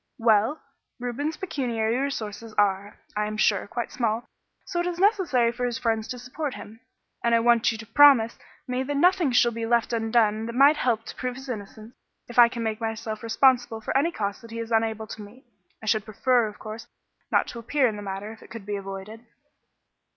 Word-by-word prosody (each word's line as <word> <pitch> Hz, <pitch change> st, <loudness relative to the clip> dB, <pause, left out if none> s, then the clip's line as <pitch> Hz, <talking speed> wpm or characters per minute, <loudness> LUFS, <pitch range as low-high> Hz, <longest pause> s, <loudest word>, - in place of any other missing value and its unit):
"Well, 225 Hz, +5 st, +3 dB, 0.4 s
Reuben's 265 Hz, +6 st, -3 dB
pecuniary 240 Hz, -10 st, -1 dB
resources 230 Hz, -5 st, -4 dB
are, 200 Hz, 0 st, +1 dB, 0.2 s
I 210 Hz, 0 st, 0 dB
am 215 Hz, 0 st, -5 dB
sure, 205 Hz, -2 st, +2 dB
quite 240 Hz, +2 st, -4 dB
small, 230 Hz, -1 st, -1 dB, 0.4 s
so 345 Hz, -, -3 dB
it 350 Hz, -, 0 dB
is 350 Hz, -1 st, -3 dB
necessary 360 Hz, -, +3 dB
for 245 Hz, +1 st, -5 dB
his 240 Hz, -2 st, -1 dB
friends 225 Hz, -2 st, -1 dB
to 250 Hz, -, -5 dB
support 255 Hz, +3 st, -5 dB
him, 220 Hz, +2 st, -11 dB, 0.4 s
and 235 Hz, 0 st, +3 dB
I -, -, +4 dB
want 235 Hz, +1 st, +4 dB
you 225 Hz, -, -5 dB
to 225 Hz, -, -9 dB
promise 235 Hz, -1 st, +5 dB, 0.3 s
me 250 Hz, 0 st, -1 dB
that 285 Hz, +2 st, -2 dB
nothing 355 Hz, -2 st, +3 dB
shall 240 Hz, -1 st, +4 dB
be 230 Hz, 0 st, -4 dB
left 235 Hz, 0 st, +1 dB
undone 225 Hz, -1 st, +1 dB
that 235 Hz, -, -6 dB
might 280 Hz, +3 st, +6 dB
help 230 Hz, -3 st, 0 dB
to -, -, -8 dB
prove 250 Hz, -1 st, -3 dB
his 265 Hz, +1 st, -10 dB
innocence 215 Hz, 0 st, -7 dB, 0.3 s
if 240 Hz, 0 st, -1 dB
I 235 Hz, -1 st, +9 dB
make 225 Hz, -1 st, -3 dB
myself 225 Hz, -1 st, -4 dB
responsible 240 Hz, 0 st, +2 dB
for 220 Hz, -, -4 dB
any 295 Hz, +5 st, +3 dB
costs 200 Hz, -8 st, -3 dB
that 230 Hz, -, -13 dB
he 230 Hz, -, -7 dB
is 230 Hz, 0 st, -5 dB
unable 220 Hz, -1 st, +1 dB
to 215 Hz, -, -9 dB
meet. 215 Hz, +6 st, -13 dB, 0.4 s
I -, -, -7 dB
should 215 Hz, -1 st, +1 dB
prefer, 240 Hz, +2 st, +2 dB
of 210 Hz, -, -9 dB
course, 220 Hz, +1 st, -8 dB, 0.4 s
not -, -, +3 dB
to 235 Hz, -, -7 dB
appear 260 Hz, +4 st, +1 dB
in 220 Hz, -, -2 dB
the 205 Hz, -, -7 dB
matter, 200 Hz, +1 st, -5 dB
if 225 Hz, -, -13 dB
it -, -, -15 dB
could 230 Hz, -4 st, -9 dB
be 205 Hz, 0 st, -3 dB
avoided." 195 Hz, +3 st, -8 dB
230 Hz, 210 wpm, -25 LUFS, 220-250 Hz, 0.4 s, I